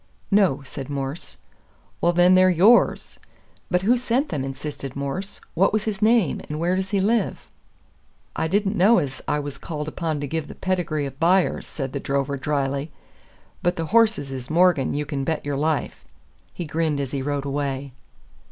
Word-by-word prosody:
"No," 190 -9 +3
said 135 0 -7
Morse. 140 +2 -5 0.6
"Well, 170 - +4
then, 175 +1 +5
they're 185 0 +6
YOURS." 190 +7 +4 0.5
"But 180 +1 +1
who 235 +5 +4
sent 250 +3 0
them?" 145 -4 -2
insisted 135 0 -6
Morse. 140 +8 -4
"What 190 +4 +3
was 215 -1 0
his 210 -3 -3
name, 220 -6 +3
and 150 +1 -4
where 175 +3 +1
does 190 0 -2
he 200 - +1
live?" 210 +1 0 0.8
"I 160 - 0
didn't 200 +3 +1
know 210 +5 +5
ez 135 -2 -2
I 150 - +1
was 145 -1 -5
called 150 -2 -5
upon 155 -1 -2
to 145 - -3
give 160 +1 -3
the - - -10
pedigree 175 -6 -1
o' 135 - -4
buyers," 170 +7 +1
said 135 -3 -5
the 140 - -2
drover 140 +1 -1
dryly; 140 +1 -2 0.7
"but 175 - +1
the 165 - -2
horses 220 -11 +3
is 130 -1 -6
'Morgan,' 170 -5 +3
you 150 +1 -1
can 140 -2 -3
bet 155 +1 -2
your 145 -1 -1
life." 150 +1 -1 0.5
He 175 - -6
grinned 155 -1 -1
as 135 -2 -3
he 140 - -2
rode 140 0 -2
away. 140 -1 -3
155 Hz, 180 wpm, -23 LUFS, 140-185 Hz, 0.8 s, they're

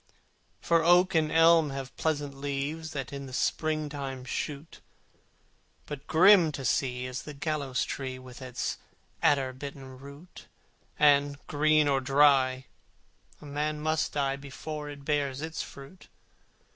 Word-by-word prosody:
The 170 - +5
oak 180 +3 +5
and 155 -2 +2
elm 165 -1 +5
have 135 -1 -6
pleasant 145 -3 -1
leaves 140 +3 -4
That 135 -1 -5
in 140 -1 -6
the 130 - -10
spring 155 +3 0
time 135 -3 -6
shoot: 145 +3 -5 1.0
But 150 -1 -8
grim 180 -1 +6
to 135 -1 -5
see 125 0 0
is 130 +1 -5
the 150 - -9
gallows 140 -3 -2
tree, 130 -2 -5
With 130 0 -12
its 130 -1 -4 0.4
alder 135 -3 +3
bitten 135 -1 -9
root, 140 +6 -13 0.5
And, 145 -1 +4
green 155 0 +3
or 135 -1 +2
dry, 135 -1 +3 0.7
a - - -13
man 150 +1 -2
must 155 +1 -1
die 140 -1 0
Before 150 +2 -7
it 140 -1 -10
bears 140 -3 0
its 160 0 -4
fruit! 140 +7 -11
145 Hz, 140 wpm, -28 LUFS, 135-155 Hz, 1.0 s, grim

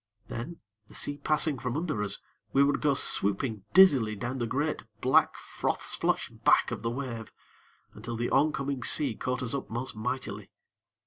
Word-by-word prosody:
Then, 155 +9 -6 0.3
the - - -14
sea 145 0 0
passing 150 -1 +2
from 125 +1 -3
under 155 -10 -2
us, 105 - -1 0.4
we 140 - +5
would 145 +1 +1
go 145 -2 +2
swooping 105 -2 +1
dizzily 135 - +6
down 120 +5 -4
the 120 - -1
great, 145 +6 -1 0.2
black, 130 +3 +3
froth - - -3
splotched - - -2
back - - +4
of - - -4
the 115 - -1
wave, 120 -3 -5 0.6
until 115 +3 -6
the 120 +1 -2
oncoming 140 -2 +1
sea 140 +1 +3
caught 125 +3 -3
us 115 - -3
up 140 - -4
most 120 +3 -4
mightily. 110 -3 -4
130 Hz, 170 wpm, -29 LUFS, 115-140 Hz, 0.6 s, dizzily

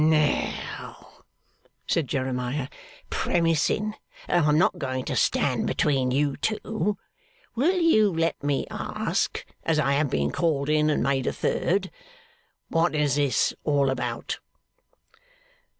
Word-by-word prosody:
'Now,' 155 -1 0 0.7
said 160 -5 0
Jeremiah; 130 0 -2 0.4
'premising 170 +5 +1 0.3
that 175 -2 +2
I'm 150 0 +4
not 180 +1 +2
going 130 -3 -3
to - - -2
stand - - +1
between 135 -4 +1
you 140 +2 +1
two, 215 -1 -1 0.6
will 340 +10 +2
you 215 - +4
let 165 -1 -1
me 145 -1 0
ask - - -2 0.2
(as 165 -2 +1
I 145 -2 +2
have 140 0 +2
been 70 -5 0
called 150 -4 0
in, 155 0 +3
and 150 - +1
made 135 0 0
a - - +2
third) 190 +1 0 0.8
what 165 0 +1
is 145 -2 +2
all 145 -2 +2
this 135 - +2
about? 125 -2 -3
150 Hz, 125 wpm, -26 LUFS, 135-170 Hz, 0.8 s, I'm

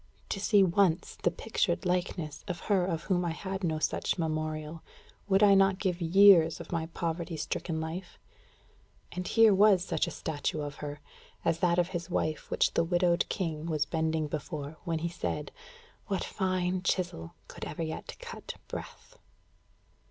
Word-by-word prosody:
To 195 - -2
see 205 0 +5
once 180 -1 +2
the - - +3
pictured 175 0 -1
likeness 175 -4 -2
of 175 -3 -4
her 195 -4 +2
of 165 -2 -2
whom 180 -2 +1
I 170 -2 -1
had 190 +2 -5
no 160 -3 0
such 155 - 0
memorial, 155 -1 -3 0.5
would 195 +1 +4
I 200 -1 +7
not 195 -1 +4
give 185 -2 -1
years 170 -1 +6
of - - -9
my 165 -2 -1
poverty 165 0 -3
stricken 160 +1 -3
life? 165 +3 -6 0.9
And 180 0 -4
here 225 -2 +6
was 195 -2 +5
such - - 0
a - - -2
statue 155 -1 -3
of 145 -1 -5
her, 145 0 -6 0.4
as 165 - +2
that 175 -1 +2
of 175 0 +2
his 175 -1 -4
wife 155 -3 -2
which - - +2
the - - +3
widowed 175 0 +2
king 165 -4 -3
was 155 -3 0
bending 160 0 0
before, 150 0 -5
when 165 -2 0
he 165 +2 -2
said: 170 - -4 0.6
"What 195 -3 -1
fine 185 -1 -1
chisel 175 - -2
Could - - -9
ever 165 - -4
yet 160 0 -6
cut 475 -1 -8
breath?" - - -9
170 Hz, 165 wpm, -30 LUFS, 160-190 Hz, 0.9 s, I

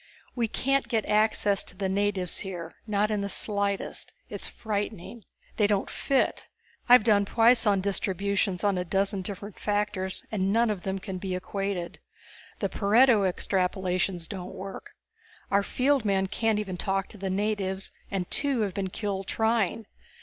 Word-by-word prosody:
We 235 -2 +1
can't 275 +2 +1
get 225 -3 0
access 210 -2 +2
to 180 - -10
the 195 - -1
natives 195 -2 0
here, 175 -4 -6
not 210 0 +1
in 210 -1 0
the 200 - -2
slightest. 200 -1 -1 0.2
It's - - -4
frightening! 210 0 -4 0.3
They 210 - +4
don't 205 -1 0
fit! 275 -1 0 0.4
I've 245 -2 +9
done 205 -2 +4
Poisson 225 -2 +4
Distributions 195 -1 0
on 200 -3 +2
a - - 0
dozen 195 +2 0
different 200 +1 -7
factors 205 -2 -1
and 195 -2 +1
none 230 +1 +3
of 200 -4 -4
them 190 +2 -2
can 190 -1 -5
be 185 -1 -3
equated. 190 -1 -3 0.6
The - - +1
Pareto 220 0 +4
Extrapolations 185 -2 -1
don't 180 -2 -7
work. 195 +1 -8 0.6
Our 200 0 +4
field 265 +5 +1
men 195 -2 +2
can't 215 +2 0
even 195 -4 -3
talk 195 +1 -1
to 210 - -12
the 195 0 -2
natives 195 -1 -1 0.2
and 190 -3 -2
two 280 -5 +1
have 200 -3 -1
been 190 0 -2
killed 195 -1 -3
trying. 225 -1 +1
200 Hz, 155 wpm, -27 LUFS, 190-215 Hz, 0.6 s, I've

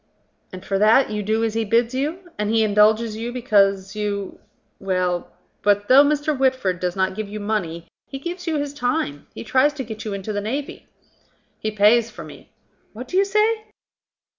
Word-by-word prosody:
"And 185 0 -10
for 195 -1 -1
that 220 +5 +4
you 210 0 -2
do 220 +2 0
as 225 -1 0
he 225 0 0
bids 230 +3 +1
you? 325 +7 -3
And 210 0 -1
he 225 0 +3
indulges 215 +1 +3
you 230 +2 -4
because 200 -6 +1
you... 205 -2 -3 0.4
Well, 185 -2 -1 0.3
but 205 0 +1
though 270 +2 +8
Mr. 295 +1 0
Whitford 260 -9 0
does 180 0 -2
not 190 -1 0
give 215 +1 -5
you 210 +1 -6
money, 190 -6 -3 0.2
he 270 - -6
gives 350 +5 -6
you 325 - 0
his 285 -1 -3
time, 245 - -2
he - - -6
tries 260 +6 +2
to 280 -3 -5
get 220 -2 -7
you 215 - -4
into 200 +2 -5
the 205 - -2
navy." 270 +7 -5 0.7
"He 215 - -2
pays 215 +2 +4
for - - -10
me." - - -13 0.4
"What 245 +4 -8
do - - -5
you 390 - +5
say?" 430 +2 +1
220 Hz, 190 wpm, -22 LUFS, 200-270 Hz, 0.7 s, though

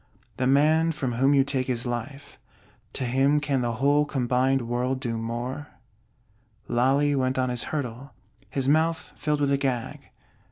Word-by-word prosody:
The 130 - 0
man 155 +4 +4
from 135 -4 -2
whom 135 +4 +3
you 135 - +5
take 135 -2 -2
his 120 -1 -2
Life, 135 +4 -6 0.5
to 130 - -3
him 135 +4 +2
can 140 -3 0
the 120 -1 -1
whole 140 +5 +3
combined 130 -1 +1
world 125 +2 -1
do 120 -3 -3
more? 120 +5 -4 1.0
Lally 135 +4 +2
went 130 -1 0
on 130 -1 +1
his 125 -1 -2
hurdle; 135 -2 -5 0.4
his 135 -1 -2
mouth 160 +3 +1
filled 150 0 -1
with 140 -1 +2
a 140 - +3
gag. 130 -4 -3
135 Hz, 160 wpm, -26 LUFS, 125-145 Hz, 1.0 s, you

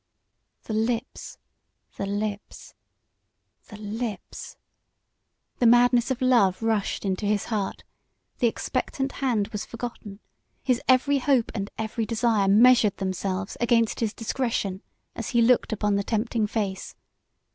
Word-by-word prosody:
The 220 - -5
lips! 225 +2 -2 0.6
The 195 - -4
lips! 205 0 -5 0.9
The 210 - -11
lips! 215 -1 -6 1.0
The 240 - +4
madness 245 +1 +5
of 260 0 -2
love 225 -6 +3
rushed 220 -2 -1
into 195 +2 -1
his 205 -1 0
heart; 200 -3 -3 0.6
the 240 - +4
expectant 270 +4 -2
hand 235 -7 -1
was 210 -1 -4
forgotten; 230 -3 -7 0.4
his 255 -3 +1
every 270 +2 +4
hope 260 -3 +2
and 200 -2 -4
every 220 0 -3
desire 225 -3 +1
measured 220 +1 +5
themselves 190 0 -3
against 230 -1 +2
his 225 -3 0
discretion 225 -5 -2 0.3
as - - -5
he - - +6
looked 245 +1 +3
upon 210 -1 0
the 200 - -1
tempting 220 0 -1
face. 200 -3 -3
220 Hz, 125 wpm, -25 LUFS, 205-240 Hz, 1.0 s, he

